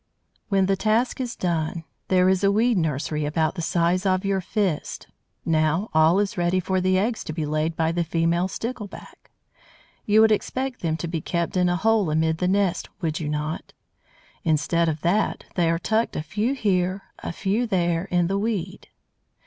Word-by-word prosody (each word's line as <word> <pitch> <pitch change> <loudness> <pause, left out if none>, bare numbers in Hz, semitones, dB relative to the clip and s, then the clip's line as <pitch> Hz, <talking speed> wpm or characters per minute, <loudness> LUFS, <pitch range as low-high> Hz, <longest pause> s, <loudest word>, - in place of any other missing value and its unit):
When 195 -2 +3
the 195 +1 +2
task 225 +6 +1
is 245 -2 -4
done 165 -2 -2 0.2
there 185 -1 +4
is 190 +1 +2
a 200 - +4
weed 230 +3 +3
nursery 155 -2 -1
about 155 +1 0
the 180 - -5
size 175 +2 +1
of 190 0 +1
your 195 -1 +1
fist. 185 -4 -2 0.4
Now 160 +5 +1
all 160 +3 +5
is 205 -1 -1
ready 175 +2 +2
for 185 +1 0
the 185 0 +2
eggs 220 +4 0
to - - -4
be 155 -1 -2
laid 155 +2 -1
by 160 0 +1
the 170 0 0
female 170 +2 +1
Stickleback. 220 0 -7 0.8
You 215 +1 +5
would 220 0 +5
expect 255 +4 -1
them 160 -2 -1
to 170 - -4
be 165 -1 -3
kept 170 +2 -2
in 180 -1 +3
a 175 - +1
hole 215 -1 +2
amid 160 +1 +1
the 180 - +1
nest, 190 -2 +1
would 160 -2 -1
you 150 -3 -3
not? 150 +1 -4 0.7
Instead 165 +1 +1
of 155 -1 -3
that, 200 +5 +1
they 170 -2 +2
are 165 - +2
tucked 220 +6 0
a 150 - -2
few 210 - -1
here, 190 -4 0 0.2
a - - -5
few 200 +7 -1
there, 175 -3 0
in 175 -2 +1
the 195 +3 0
weed. 200 -4 -3
180 Hz, 190 wpm, -24 LUFS, 165-200 Hz, 0.8 s, all